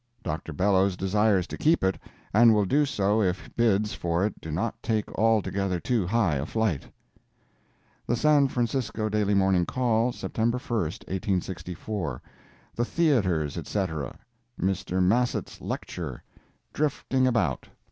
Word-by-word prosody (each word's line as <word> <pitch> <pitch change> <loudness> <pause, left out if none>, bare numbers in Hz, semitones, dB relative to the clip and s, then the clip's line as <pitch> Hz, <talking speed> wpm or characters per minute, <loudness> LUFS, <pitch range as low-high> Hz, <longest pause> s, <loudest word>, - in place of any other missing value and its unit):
Dr. 80 +2 -4
Bellows 95 +3 +2
desires 100 0 +2
to - - -8
keep 160 - +3
it, 95 0 +1 0.3
and 115 +1 +6
will 105 -1 +3
do 145 +9 +2
so 105 -5 +1
if 95 -2 -2
bids 110 -3 +2
for 85 +2 0
it 105 - -4
do 80 - -7
not 90 +9 -2
take 110 -3 -2
altogether 100 -4 +1
too 110 -3 0
high 100 -8 +2
a 65 - -2
flight. 110 -9 -1 1.2
The 120 - +2
San 145 +1 +4
Francisco 120 -3 -1
Daily 105 -1 +1
Morning 95 -2 +3
Call, 120 +2 +1
September 120 0 -1
1, 120 -2 -2 0.3
1864 90 - -3 0.5
THE 120 - 0
THEATRES, 100 - +1
ETC. 80 -10 -3 0.4
MR. 95 0 0
MASSETT'S 120 +7 0
LECTURE—"DRIFTING 135 -3 -3
ABOUT." 105 - 0
105 Hz, 125 wpm, -27 LUFS, 90-120 Hz, 1.2 s, and